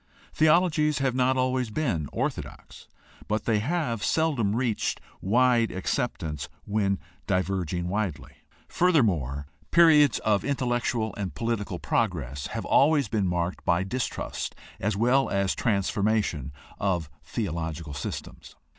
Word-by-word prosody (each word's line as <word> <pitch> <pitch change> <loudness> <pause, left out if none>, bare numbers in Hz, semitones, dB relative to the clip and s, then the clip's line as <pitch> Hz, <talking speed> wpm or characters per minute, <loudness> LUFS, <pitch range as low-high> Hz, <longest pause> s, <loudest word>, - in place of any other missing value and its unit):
Theologies 155 -1 +3
have 135 -2 +1
not 130 +1 +2
always 130 -2 +1
been 105 - -1
orthodox, - - -5 0.4
but 105 0 -1
they 110 -2 +2
have 125 -4 -1
seldom 125 -8 +1
reached 120 -3 0 0.2
wide 120 +2 +3
acceptance 90 - -3 0.2
when 100 -2 +1 0.3
diverging 90 -2 -1
widely. 90 -8 -2 0.4
Furthermore, 90 - +2 0.2
periods 155 -4 +6
of 105 -2 +2
intellectual 120 -5 -1
and 95 -8 -4
political 115 +1 -2
progress 70 +3 -1
have - - -5
always 140 -4 +4
been 105 -3 +1
marked 90 0 -2
by 85 +2 +2
distrust 125 +6 -3 0.2
as 100 0 -1
well 125 +5 +3
as 100 -1 +1
transformation 100 - 0 0.3
of 90 -6 0 0.2
theological 80 -2 -4
systems. 70 - -7
110 Hz, 115 wpm, -27 LUFS, 90-130 Hz, 0.4 s, periods